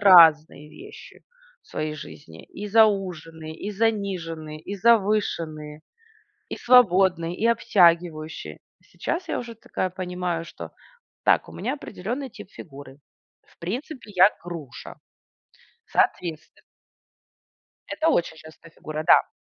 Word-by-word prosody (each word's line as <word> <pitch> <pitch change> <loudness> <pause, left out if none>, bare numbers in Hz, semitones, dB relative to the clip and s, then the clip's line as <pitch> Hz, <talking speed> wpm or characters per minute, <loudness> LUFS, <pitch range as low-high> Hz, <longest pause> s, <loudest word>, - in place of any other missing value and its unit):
разные 160 -6 +6
вещи 415 +4 -13 0.4
в - - -27
своей 155 0 -3
жизни: 80 - -11
и 205 +2 -8
зауженные, 180 -7 +1
и 205 - -6
заниженные, 185 -8 -2
и 200 - -6
завышенные, 190 -8 +1 0.7
и - - -4
свободные, 185 -8 +4
и 230 - 0
обтягивающие. 170 -8 +2 0.2
Сейчас 340 +2 -4
я - - -1
уже 235 -1 -7
такая 185 -3 -3
понимаю, 180 -2 -3
что: - - -9 0.5
"Так, - - +3
у - - -13
меня - - -3
опреденный 250 +1 -5
тип 200 - -12
фигуры, 140 -3 -12 0.5
в - - -28
принципе 235 - -6
я 185 +3 +7
груша. 160 -9 -9 0.9
Соответстве" 165 -3 -1 1.3
Это 325 +1 0
очень 170 - +1
частая 160 +1 -15
фигура, 155 -1 -6
да. - - +6
180 Hz, 115 wpm, -24 LUFS, 160-210 Hz, 1.3 s, я